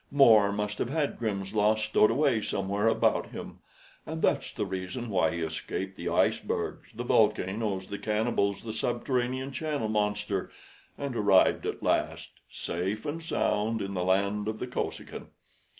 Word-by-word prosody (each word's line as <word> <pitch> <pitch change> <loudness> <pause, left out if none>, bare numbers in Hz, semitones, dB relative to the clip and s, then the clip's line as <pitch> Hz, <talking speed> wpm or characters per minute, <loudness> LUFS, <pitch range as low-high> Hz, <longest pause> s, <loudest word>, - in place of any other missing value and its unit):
More 110 -8 +6
must 105 0 -3
have 120 - -1
had 150 0 -1
Grimm's 100 -4 -2
Law 105 0 +4
stowed 110 0 +3
away 130 -2 +2
somewhere 100 +2 -1
about 115 - +2
him; - - -8 0.4
and - - -5
that's - - +1
the - - -3
reason 95 +6 -4
why 95 - +3
he 85 - -3
escaped 90 +4 -4
the - - -4
icebergs, - - 0
the - - -4
volcanoes, 95 0 +1
the 100 +1 -6
cannibals, 105 -2 0
the 110 -1 -5
subterranean 125 +3 -1
channel 145 -6 -2
monster, 105 -2 -1 0.5
and 140 -3 -4
arrived 100 -4 +4
at - - -4
last - - 0 0.2
safe 95 +6 -3
and 155 +3 -3
sound 110 -8 0
in 100 -1 -4
the 90 -2 -1
land 100 +3 +1
of 110 0 -2
the 125 - -3
Kosekin. 125 - -5
105 Hz, 155 wpm, -29 LUFS, 100-120 Hz, 0.5 s, More